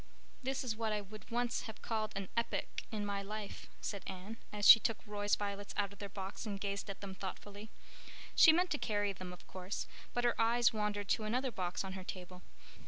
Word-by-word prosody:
"This 265 +1 -1
is 235 -4 -1
what 225 -1 -1
I 210 - +1
would 205 +1 -11
once 240 0 0
have 220 - -10
called 215 -2 -1
an 195 -1 -2
epoch 235 - -1
in 210 -2 -2
my 200 -1 -1
life," 210 +1 -6
said 200 - -3
Anne, 190 +4 -6
as 205 -1 +2
she 225 - +13
took 225 0 0
Roy's 205 -1 +1
violets 200 0 -4
out 200 -1 +1
of 200 - -17
their 200 -1 -5
box 195 0 -5
and 200 -2 -3
gazed 200 +1 -2
at 195 - -6
them 200 -1 -5
thoughtfully. 200 +3 -7 0.7
She 320 - +10
meant 355 +3 +2
to 295 - +1
carry 205 -2 +1
them, 185 -1 -7
of 180 - -11
course, 185 +2 -4 0.3
but 245 - +2
her 240 - +4
eyes 235 +1 +5
wandered 210 -1 -1
to 215 - +2
another 250 +4 0
box 180 -3 -2
on 190 -1 -5
her 190 -1 -6
table. 180 0 -7
205 Hz, 215 wpm, -36 LUFS, 195-225 Hz, 0.7 s, she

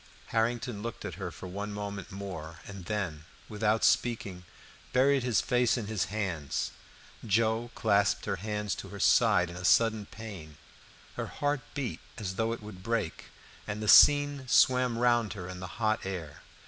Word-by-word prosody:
Harrington 115 -1 -1
looked 115 +1 -6
at - - -4
her 90 - -3
for 80 +3 -10
one 100 +3 -5
moment 100 -1 -6
more, 90 -5 -7
and 95 -3 -9
then, 85 -7 -3 0.2
without 110 +1 0
speaking, 100 -7 +1 0.5
buried 135 +2 +4
his 120 -3 +2
face 125 -2 +2
in 115 - -3
his 105 -2 -1
hands. 90 -8 -3 0.5
Joe 110 +2 +1
clasped 100 -2 +2
her 100 - -1
hands 105 +1 -3
to - - -7
her 100 +1 -9
side 90 -2 +4
in - - -9
a 90 - -7
sudden 110 +2 +3
pain; 95 -9 -9 0.6
her - - -3
heart 145 -1 -1
beat 140 -4 -3 0.2
as 100 -5 -4
though 110 +4 0
it 115 -2 -5
would 105 -3 -10
break, 110 -4 -2 0.4
and 105 0 -3
the 110 - -4
scene 145 +3 +6
swam 125 -1 +4
round 120 -2 +3
before 100 -3 -6
her 90 - -7
in 90 0 -7
the 95 - -6
hot 110 -1 +1
air. 85 -7 -6
105 Hz, 175 wpm, -30 LUFS, 95-115 Hz, 0.6 s, scene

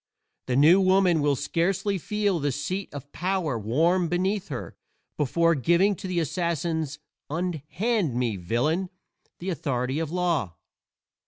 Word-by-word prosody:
The 125 - 0
New 160 +8 +6
Woman 185 -3 +4
will 145 -1 +2
scarcely 180 +7 0
feel 205 -1 0
the 145 -1 0
seat 170 +9 -3
of 145 0 -9
power 180 -5 -1
warm 165 - +2
beneath 190 +3 0
her 130 -5 -6 0.4
before 165 +4 +2
giving 170 - +3
to 190 - -6
the 180 -2 0
assassin's 160 -2 -1 0.3
"unhand 175 - -1
me, 120 -3 0
villain!" 125 - 0 0.5
the 185 +2 -4
authority 130 -2 -1
of 165 -2 -2
law. 165 - -1
165 Hz, 135 wpm, -26 LUFS, 145-185 Hz, 0.5 s, New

